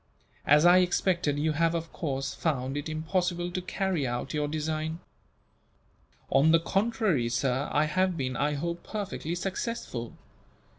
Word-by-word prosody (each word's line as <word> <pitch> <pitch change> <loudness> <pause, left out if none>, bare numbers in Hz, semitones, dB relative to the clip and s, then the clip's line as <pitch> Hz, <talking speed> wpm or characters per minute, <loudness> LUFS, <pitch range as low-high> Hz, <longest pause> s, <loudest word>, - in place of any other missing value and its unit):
As 150 +3 +6
I 175 +1 +8
expected, 175 -4 +1
you 155 +2 +1
have, 165 +2 +1
of 165 0 -4
course, 135 -3 -3
found 135 -4 -1
it 145 +2 -3
impossible 175 +2 -1
to 185 +1 -2
carry 185 -6 -1
out 120 +4 -3
your 150 -1 0
design." 155 +1 -2 1.3
"On 150 +4 +5
the 165 - +6
contrary, 195 - +1
sir, 125 +3 0
I 150 - +3
have 185 +3 +1
been, 130 -3 -2
I 145 +4 0
hope, 170 +3 -3
perfectly 195 -5 -4
successful. 185 - -4
160 Hz, 145 wpm, -28 LUFS, 145-180 Hz, 1.3 s, I